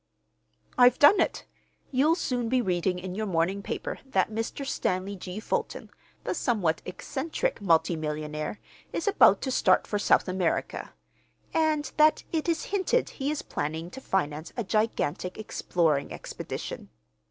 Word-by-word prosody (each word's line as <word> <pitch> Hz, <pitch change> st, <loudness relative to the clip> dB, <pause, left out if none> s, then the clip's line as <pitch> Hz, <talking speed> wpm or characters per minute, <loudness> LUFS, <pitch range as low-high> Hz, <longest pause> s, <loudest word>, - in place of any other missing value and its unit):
"I've 245 Hz, 0 st, +7 dB
done 335 Hz, +8 st, +7 dB
it. -, -, -1 dB, 0.5 s
You'll 290 Hz, +5 st, +3 dB
soon 245 Hz, -9 st, -1 dB
be 255 Hz, +1 st, +3 dB
reading 180 Hz, -4 st, 0 dB
in 180 Hz, 0 st, -5 dB
your 215 Hz, +2 st, -2 dB
morning 185 Hz, +2 st, 0 dB
paper -, -, -4 dB
that 220 Hz, -7 st, 0 dB
Mr. 225 Hz, +5 st, -3 dB
Stanley 195 Hz, -6 st, -1 dB
G. 185 Hz, +1 st, -6 dB
Fulton, 220 Hz, -, -3 dB, 0.3 s
the -, -, -1 dB
somewhat 185 Hz, -, 0 dB
eccentric 290 Hz, -, -3 dB
multi 165 Hz, -2 st, +3 dB
millionaire, 150 Hz, +3 st, -4 dB, 0.3 s
is 335 Hz, -, -3 dB
about 410 Hz, -, +6 dB
to 265 Hz, -, -1 dB
start 185 Hz, -7 st, +3 dB
for 205 Hz, -, -2 dB
South -, -, +3 dB
America, 185 Hz, -2 st, -1 dB, 0.6 s
and 310 Hz, -3 st, +1 dB
that 310 Hz, 0 st, +5 dB
it 325 Hz, 0 st, -1 dB
is 330 Hz, -1 st, 0 dB
hinted 405 Hz, +5 st, +1 dB
he 275 Hz, 0 st, -3 dB
is 300 Hz, -1 st, -2 dB
planning 160 Hz, +4 st, -4 dB
to 265 Hz, -, -9 dB
finance 155 Hz, -, -2 dB
a 235 Hz, -, 0 dB
gigantic 200 Hz, -4 st, -1 dB
exploring 165 Hz, -8 st, 0 dB
expedition. -, -, -6 dB
205 Hz, 145 wpm, -27 LUFS, 175-270 Hz, 0.6 s, I've